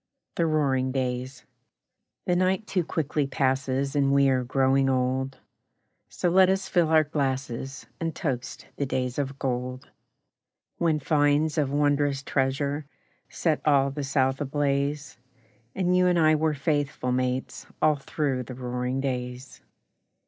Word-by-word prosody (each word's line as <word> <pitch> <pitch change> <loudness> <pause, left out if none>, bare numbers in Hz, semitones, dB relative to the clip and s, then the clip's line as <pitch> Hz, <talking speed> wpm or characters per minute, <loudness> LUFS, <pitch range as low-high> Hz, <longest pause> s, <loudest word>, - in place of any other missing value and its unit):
The 170 - +1
Roaring 135 -4 +1
Days 130 0 -3 0.8
The 180 - +1
night 185 +3 +1
too 185 -4 0
quickly 150 -2 -1
passes 135 0 0
And 140 -1 +3
we 140 0 +4
are 130 -1 +1
growing 135 +1 +2
old, 130 +1 0 0.7
So - - -2
let 185 +1 +6
us 190 0 0
fill 175 -3 +2
our 160 -1 +5
glasses 135 -3 -3
And 165 -1 -3
toast 125 -6 -4
the 140 - -1
Days 130 0 -2
of 135 -1 -3
Gold; 125 0 -3 0.9
When 160 -3 +2
finds 145 +1 +2
of 145 -3 +1
wondrous 145 -1 +1
treasure 140 +2 -1 0.4
Set 160 -3 0
all 140 -2 +3
the 145 +1 -4
South 135 0 +1
ablaze, 145 0 -1 0.6
And 180 -1 +1
you 180 0 +4
and 180 -1 +3
I 155 -1 +5
were 155 0 +1
faithful 145 -3 -1
mates 125 +1 -2
All 155 -1 +3
through 135 -2 -2
the 125 - -8
roaring 125 +1 -3
days! 125 -1 -5
140 Hz, 140 wpm, -26 LUFS, 130-150 Hz, 0.9 s, let